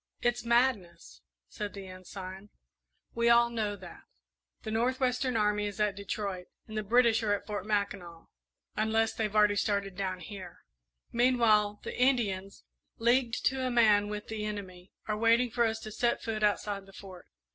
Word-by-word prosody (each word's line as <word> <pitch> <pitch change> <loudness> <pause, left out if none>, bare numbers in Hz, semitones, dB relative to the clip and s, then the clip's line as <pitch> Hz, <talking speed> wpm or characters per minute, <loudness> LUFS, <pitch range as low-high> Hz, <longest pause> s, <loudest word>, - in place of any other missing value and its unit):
"It's 240 0 +1
madness," 235 -8 0 0.3
said 205 -2 -6
the 195 -1 -7
Ensign; 185 +1 -9 0.6
"we 235 0 +2
all 235 0 +5
know 215 -3 -2
that. 180 -3 -12 0.6
The 220 - -4
North 245 +4 0
western 250 -1 0
Army 210 -1 +1
is 205 0 -7
at 210 -2 +1
Detroit, 200 -2 -4 0.2
and 220 - -9
the 215 - 0
British 235 +2 +3
are 210 -2 +2
at - - -8
Fort 205 -1 -5
Mackinac 200 -5 -2 0.5
unless 220 +1 +1
they've 215 -2 -2
already 210 -1 +4
started 200 -2 -1
down 185 -1 -3
here. 190 +2 -9 0.5
Meanwhile, 230 -4 +3
the - - -5
Indians, 210 -7 0 0.3
leagued 240 +1 +1
to 265 0 +1
a 255 - 0
man 215 -4 +4
with 210 0 -5
the 220 -1 -4
enemy, 190 -3 -6 0.2
are 215 - 0
waiting 230 +2 +3
for 235 +1 +2
us 220 0 -1
to 215 - -7
set 240 +2 0
foot 220 -1 -3
outside 205 -1 0
the 195 - -16
Fort. 190 -2 -12
210 Hz, 170 wpm, -30 LUFS, 200-235 Hz, 0.6 s, all